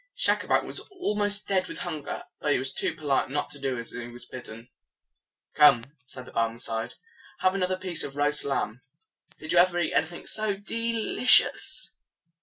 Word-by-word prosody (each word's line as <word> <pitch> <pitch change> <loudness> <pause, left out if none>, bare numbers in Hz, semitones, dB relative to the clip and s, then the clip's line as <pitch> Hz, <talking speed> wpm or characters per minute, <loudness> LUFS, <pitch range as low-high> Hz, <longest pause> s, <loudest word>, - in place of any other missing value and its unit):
Schacabac - - +2
was - - -2
almost 210 - -1
dead 190 -2 +1
with - - -8
hunger, 155 -5 -5 0.2
but 145 - +1
he - - +2
was 130 +1 +1
too - - 0
polite 145 -4 0
not 145 +2 -2
to 145 - -7
do 135 -2 -2
as 115 0 -7
he 120 -1 -6
was 120 0 -8
bidden. 115 -2 -9 0.9
"Come," 140 -6 +6 0.2
said 130 0 -9
the - - -13
Barmecide, 115 0 -2 0.5
"have 185 - +3
another 185 -1 -1
piece 185 -3 -2
of 135 - -5
the - - -13
roast 145 +1 +2
lamb. 130 -4 -2 0.6
Did 155 - -6
you 175 - +5
ever 175 0 +4
eat 175 - 0
anything 165 +3 -1
so 215 -2 0
de 230 +3 -3
li 230 +2 -3
cious?" - - +5
150 Hz, 185 wpm, -27 LUFS, 125-190 Hz, 0.9 s, Come